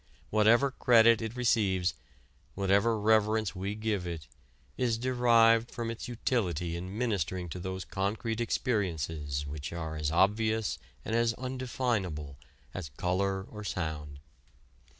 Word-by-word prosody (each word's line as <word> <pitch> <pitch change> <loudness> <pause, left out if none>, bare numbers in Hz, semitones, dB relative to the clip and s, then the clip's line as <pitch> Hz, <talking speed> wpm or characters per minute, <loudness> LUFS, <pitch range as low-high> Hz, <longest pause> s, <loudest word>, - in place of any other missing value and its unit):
Whatever 115 +6 +4
credit 115 -3 +5
it 110 +1 -4
receives, 100 -8 +2 0.6
whatever 100 +4 +2
reverence 110 0 +2
we 100 +3 -3
give 105 -4 -2
it, 80 -5 -6 0.5
is 120 -3 +1
derived 115 -2 +4
from 115 -1 -4
its 115 - -6
utility 90 - -1
in 90 +4 -6
ministering 95 -7 -1
to 90 - -6
those 95 +1 -5
concrete 110 +4 -2
experiences 80 - -1
which 70 0 -6
are 80 -2 -4
as 75 -1 -1
obvious 110 +5 +2 0.3
and 110 - -1
as 115 -1 +2
undefinable 120 - -3 0.3
as 90 -5 -5
color 95 +2 0
or 105 +1 -9
sound. 75 -7 -4
105 Hz, 125 wpm, -30 LUFS, 90-115 Hz, 0.6 s, credit